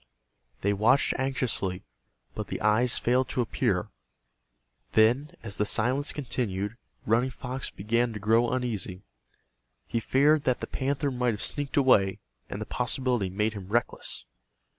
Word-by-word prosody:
They 100 +1 +2
watched 115 +7 +3
anxiously, 130 -9 -1 0.5
but - - -5
the - - -4
eyes 110 +4 +3
failed 125 +2 +1
to 125 - 0
appear. 120 - 0 1.0
Then, 120 +7 +3
as 105 -3 -2
the - - +2
silence 125 +7 0
continued, 110 -7 -3 0.3
Running 120 +4 +2
Fox 130 +1 -3
began 115 +4 0
to 105 - -5
grow 115 +3 +3
uneasy. 110 -7 -3 0.8
He 115 - -1
feared 145 +6 +3
that 130 -1 +2
the - - -4
panther 140 +1 -1
might 125 -3 0
have 105 - -5
sneaked 145 -1 -2
away, 100 -9 +4 0.3
and - - -5
the - - -4
possibility 125 -4 -1
made 105 +4 0
him 100 -3 -8
reckless. 120 +3 -1
120 Hz, 140 wpm, -28 LUFS, 105-130 Hz, 1.0 s, away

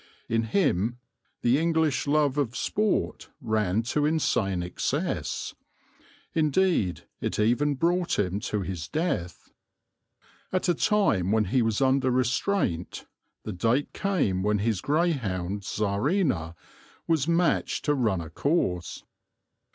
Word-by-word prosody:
In 115 0 0
him 115 - +1 0.5
the 120 +4 +4
English 160 -5 +1
love 145 -2 +2
of 125 -4 -1
sport 210 0 -1
ran 110 -1 0
to 145 +5 0
insane 110 - +1
excess. 90 - -2 0.8
Indeed 155 - +1 0.2
it - - -2
even 125 +7 +2
brought 175 +4 +1
him 95 0 0
to 105 0 -2
his 90 -4 -5
death. 150 - -3 1.0
At 185 0 0
a 175 - +4
time 160 - +2
when 110 -1 +3
he 125 +7 +2
was 115 0 0
under 130 0 +3
restraint 125 - 0 0.4
the 110 - -5
date 115 +10 0
came 175 - 0
when 105 +2 +1
his 105 -1 0
greyhound 120 - 0
Czarina 105 - 0 0.5
was 160 -3 +1
matched 170 +1 +1
to 150 - +3
run 110 -10 +1
a 80 -1 -9
course. 90 - -1
120 Hz, 120 wpm, -27 LUFS, 100-155 Hz, 1.0 s, the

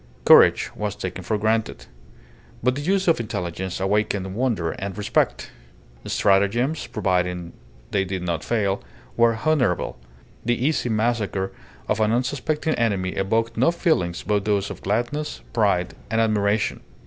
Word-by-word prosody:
Courage - - +6
was 105 -2 -3
taken 95 0 -5
for 110 +4 0
granted. 110 +1 -1 0.8
But 125 +1 +3
the 140 - -4
use 190 +4 +1
of 165 - +4
intelligence 95 -4 -4
awakened 95 -1 0
wonder 110 -8 0
and 95 0 -6
respect. 105 - 0 0.6
Stratagems, 105 +10 +2
providing 90 -4 -1 0.4
they 100 -2 +2
did 95 -1 -4
not 85 -3 -2
fail, 100 -4 0 0.3
were 115 -1 +3
honourable; 125 - +1 0.4
the 120 +1 +1
easy 135 -1 0
massacre 110 -4 0 0.4
of - - 0
an 110 0 +2
unsuspecting 145 +6 0
enemy 100 -5 0
evoked 110 +5 -1
no 130 +8 +4
feelings 160 - 0
but 105 -1 0
those 100 -2 0
of - - -9
gladness, 120 - -2
pride, 90 0 +1 0.2
and 110 +1 +1
admiration. 105 -1 +1
105 Hz, 135 wpm, -23 LUFS, 95-120 Hz, 0.8 s, Courage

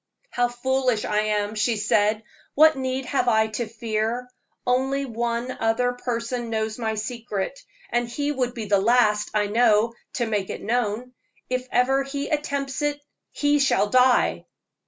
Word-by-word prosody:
"How 245 0 +2
foolish 250 -1 0
I 210 - +1
am," 210 -1 0
she 220 +1 0
said. 210 +1 +2 0.3
"What 315 +1 +6
need 260 0 -2
have 260 -1 0
I 220 -2 +3
to 220 +2 -3
fear? 225 +2 -2 0.4
Only 265 +2 +1
one 235 0 -2
other 245 +2 +1
person 240 -1 -3
knows 220 0 -2
my 220 -2 -1
secret, 220 +1 -4 0.3
and 240 0 0
he 290 +4 -1
would 250 -3 -2
be 225 -3 -4
the 200 -1 +3
last, 210 -2 +3
I 210 -1 +3
know, 225 +1 +3 0.2
to 240 - 0
make 210 -4 -2
it - - -6
known. 240 +2 -1 0.4
If 255 0 -1
ever 265 +2 +3
he 280 +1 -4
attempts 280 -2 -2
it, 295 0 0 0.3
he 290 0 +1
shall 210 -7 +2
die!" 255 0 +3
240 Hz, 155 wpm, -24 LUFS, 220-260 Hz, 0.4 s, What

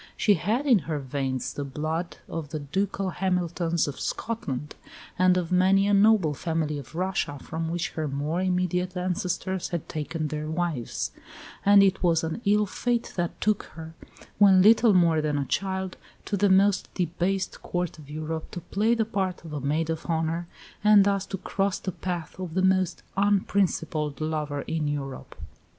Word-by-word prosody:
She 210 - +4
had 215 - 0
in 245 -7 +5
her 155 - 0
veins 135 -1 -3
the 145 - -4
blood 155 +5 -3
of 160 -3 -5
the 155 - -4
ducal 190 +6 -2
Hamiltons 175 -3 0
of 145 - -5
Scotland, 150 - -3 0.5
and 185 0 +5
of 175 -2 -2
many 190 +2 +4
a 205 - +2
noble 200 -6 +5
family 155 -1 -2
of 140 +3 -11
Russia, 185 -5 -1
from 160 +4 -4
which 175 0 -2
her 155 -1 -3
more 145 +5 -2
immediate 180 0 0
ancestors 180 +1 -2
had 170 -4 -4
taken 155 0 -3
their 155 +1 -4
wives; 160 -7 -2 0.5
and 200 0 +7
it 190 -1 +2
was 165 -2 +3
an 160 +7 -3
ill 210 +1 +4
fate 235 +4 -2
that 175 -2 -2
took 215 -1 +1
her, 160 0 -8 0.5
when 190 -2 +7
little 220 0 +6
more 165 -3 +4
than 150 -1 0
a 140 - -1
child, 190 +3 -2 0.3
to 205 - -1
the 200 +1 +3
most 195 +1 +3
debased 185 +2 -1
Court 175 -2 -3
of 145 -2 -13
Europe 155 +1 -4
to - - -6
play 215 +7 +1
the 225 -1 +1
part 190 -5 -2
of 150 -4 -5
maid 155 +3 0
of 160 0 -5
honour, 165 +1 -1 0.4
and 210 -1 +7
thus 200 -1 +1
to 195 - -4
cross 195 +1 -1
the 190 - -4
path 175 -1 -5
of 180 -3 -5
the 185 - +2
most 185 -2 +2
unprincipled 185 -7 +1
lover 150 -2 -2
in 160 -2 -2
Europe. 140 -2 -5
175 Hz, 170 wpm, -26 LUFS, 155-195 Hz, 0.5 s, and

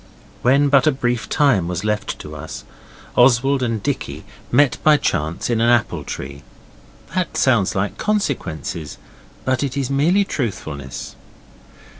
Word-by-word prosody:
When 140 +3 +4
but 140 +1 +4
a - - +6
brief 120 -3 -2
time 135 - +3
was 90 +2 -3
left 105 0 -2
to - - -9
us, - - -7 0.5
Oswald 130 +2 +4
and 115 -4 -1
Dicky - - -3 0.3
met 140 +2 +4
by 155 -1 +6
chance 80 - -1
in 115 -2 +1
an 115 - +4
apple 120 -2 +2
tree. 70 +1 -7 0.7
(That 185 -3 -1
sounds 120 -8 +2
like 95 +1 -2
'consequences', 85 - -2 0.5
but 130 -1 +1
it 140 -1 -2
is 135 -1 -1
mere 165 +9 +3
truthfulness.) 80 - -5
125 Hz, 140 wpm, -20 LUFS, 100-140 Hz, 0.7 s, a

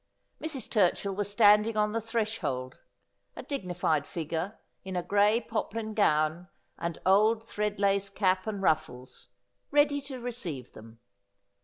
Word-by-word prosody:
Mrs. 295 -7 -3
Turchill 200 -1 +1
was 205 0 -2
standing 210 +1 +5
on 210 0 +2
the 230 +1 -1
threshold 215 - -3 0.3
— - - -48
a - - -7
dignified 180 - -1
figure 170 +5 -4 0.3
in 190 -1 -6
a 180 - -1
gray 205 +4 +3
poplin 220 -1 -4
gown 160 -2 +1 0.3
and 170 -1 -3
old 215 +4 +4
thread 210 -1 -2
lace 200 0 +2
cap 190 -1 +1
and 205 -3 -3
ruffles 130 -7 -1 0.2
— - - -50
ready 290 0 +3
to 270 -2 -7
receive 205 - -6
them. 115 +1 -14
200 Hz, 145 wpm, -29 LUFS, 170-220 Hz, 0.3 s, standing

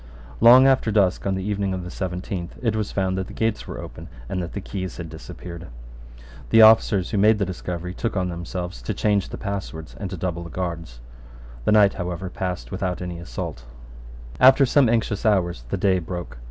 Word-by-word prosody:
Long 125 +3 +8
after 135 -4 +3
dusk 100 -2 +2
on 95 - +1
the 95 - -3
evening 100 -1 -1
of 90 - -5
the 90 - -7
seventeenth 90 -1 -5
it 115 -2 +1
was 105 -2 -2
found 95 -1 -1
that 95 - -3
the - - -10
gates 110 -1 -1
were - - -6
open - - -9 0.2
and 90 - -3
that 85 - -6
the - - -3
keys 95 -2 -5
had 85 -2 -6
disappeared. 85 +2 -9 0.8
The 115 0 +7
officers 110 -4 +5
who 105 - +1
made 105 +2 +5
the 100 - 0
discovery 90 -1 -5
took 115 +1 -3
on 90 -1 0
themselves 90 +1 -5
to 105 - -4
change 105 -2 +1
the - - -6
passwords 95 -6 -5
and 100 - -4
to 95 - -6
double 85 -1 -3
the 85 - -8
guards. 85 -10 -5 0.6
The - - +3
night, 105 -2 +6
however, 90 0 -4
passed 90 -1 -4
over - - -9
without 95 -2 -2
any 90 -1 -5
assault, - - -6 0.7
After 135 +2 +7
some 130 -1 +4
anxious 115 -3 0
hours 90 - +1
the - - -1
day 95 -2 +2
broke. 90 -7 -7
95 Hz, 205 wpm, -23 LUFS, 90-105 Hz, 0.8 s, Long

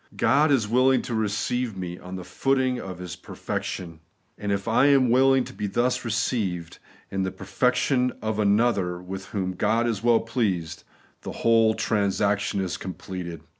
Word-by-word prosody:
God 145 +6 +3
is 120 -6 +2
willing 130 +4 +3
to 120 - -5
receive 110 +1 -1
me 90 -1 -5
on 90 +1 -8
the 90 - -6
footing 130 +3 0
of 95 -2 -7
His 90 -3 -7
perfec - - -5
tion; 85 -3 -6 0.4
and 105 -1 -4
if 100 +1 -2
I 115 +5 +4
am 135 -4 +4
willing 135 +1 +4
to - - -10
be 105 - -3
thus 120 +6 0
received, 105 -7 -2 0.3
in 95 - -1
the 95 - 0
perfection 125 +7 +1
of 110 -1 -2
another 100 -4 +2
with 95 +1 -7
whom 95 -1 -3
God 110 +5 +1
is 115 -4 -1
well 120 -1 +4
pleased, 105 -8 -2 0.4
the - - -6
whole 115 -1 +4
transaction 100 -2 0
is 95 -2 -3
completed. 90 -2 -7
105 Hz, 170 wpm, -25 LUFS, 95-120 Hz, 0.4 s, I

